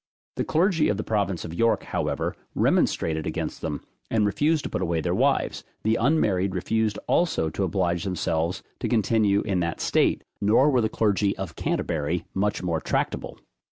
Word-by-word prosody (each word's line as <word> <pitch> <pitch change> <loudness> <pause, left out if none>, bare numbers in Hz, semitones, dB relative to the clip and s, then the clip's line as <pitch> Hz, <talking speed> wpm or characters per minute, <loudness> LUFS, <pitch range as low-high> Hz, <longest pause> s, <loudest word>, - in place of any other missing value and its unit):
The - - +1
clergy 170 -1 +2
of 100 - 0
the 105 - -2
province 100 -5 -1
of 85 - -6
York, 115 +6 +2
however, - - -2 0.2
remonstrated 80 -1 +1
against - - -3
them, 75 -3 -3 0.3
and 110 -2 +2
refused 145 - +1
to - - -4
put - - -2
away 85 -1 0
their 80 - -1
wives; - - +1 0.2
the 110 +1 +2
unmarried 105 - +2
refused 110 +3 0
also 120 - +1
to 100 - -2
oblige 85 -2 0
themselves 85 -2 -1 0.2
to - - -2
continue 110 -3 +2
in 95 -4 -1
that 85 -1 -2
state; - - +2 0.2
nor 115 +8 +4
were 125 -3 +3
the 110 - +1
clergy 105 -2 +1
of 95 -4 -5
Canterbury 80 +2 -1
much 105 +1 0
more 85 -3 -1
tractable. - - -2
100 Hz, 170 wpm, -25 LUFS, 85-110 Hz, 0.3 s, nor